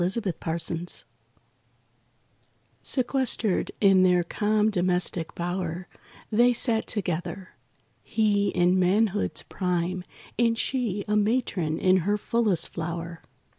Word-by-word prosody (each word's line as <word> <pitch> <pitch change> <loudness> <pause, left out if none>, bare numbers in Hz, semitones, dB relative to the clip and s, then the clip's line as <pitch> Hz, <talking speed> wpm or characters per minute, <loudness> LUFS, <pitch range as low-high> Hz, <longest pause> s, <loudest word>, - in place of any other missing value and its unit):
DOMESTIC 190 0 -1
BLISS 165 +1 -1
IV 170 +1 -3 1.8
Sequestered 240 - +1
in 195 -2 +5
their 180 -1 +4
calm 210 +4 +1
domestic 180 -3 0
bower, 175 0 -3 0.4
They 240 +3 +4
sat 230 -2 +1
together. 180 -1 -3 0.5
He 205 -2 +1
in 180 -1 +2
manhood's 205 +3 +1
prime 180 -1 -2 0.4
And 230 -1 +2
she 225 -6 -1
a 210 - +1
matron 205 -7 0
in 185 0 +3
her 205 +4 0
fullest 210 -6 0
flower. 165 0 -5
185 Hz, 105 wpm, -26 LUFS, 175-215 Hz, 1.8 s, in